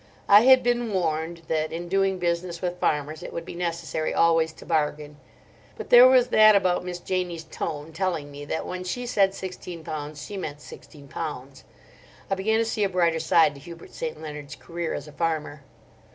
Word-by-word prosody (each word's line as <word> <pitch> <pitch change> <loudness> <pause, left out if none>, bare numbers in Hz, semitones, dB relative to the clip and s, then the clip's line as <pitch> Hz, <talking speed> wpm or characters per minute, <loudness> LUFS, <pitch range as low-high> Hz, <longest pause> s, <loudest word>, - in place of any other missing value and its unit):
I 205 +1 +8
had 260 -1 +7
been 240 -1 0
warned 165 -2 -2
that 155 -1 -1
in 170 +1 -5
doing 195 +1 +1
business 170 0 -2
with 180 0 -3
farmers 150 +1 -1
it - - -7
would 170 - -6
be - - -8
necessary 170 -3 -3
always 165 -1 +3
to - - -14
bargain; 150 -2 -1 0.6
but - - -8
there 245 +1 +10
was 255 -1 +4
that 215 -2 +7
about 185 -3 +2
Miss 180 -1 -5
Janie's 175 -2 -3
tone 155 -1 -6
telling 165 -5 -2
me 145 0 -9
that 160 - -3
when 185 0 -5
she 245 +7 -4
said 195 -5 +2
sixteen 180 -3 -7
pounds 150 -1 -6
she 205 - -7
meant 150 -6 -5
sixteen 145 -1 -13
pounds. 140 -3 -7 0.7
I - - +4
began 205 +3 +1
to 230 - +1
see 220 -1 -1
a 200 - +1
brighter 170 -3 +1
side 160 -1 +4
to 140 - -13
Hubert 170 +3 -12
St. 160 -1 -5
Leonard's 150 -2 -8
career 170 -1 -5
as - - -7
a - - -11
farmer. 155 -3 -2
170 Hz, 195 wpm, -25 LUFS, 155-190 Hz, 0.7 s, there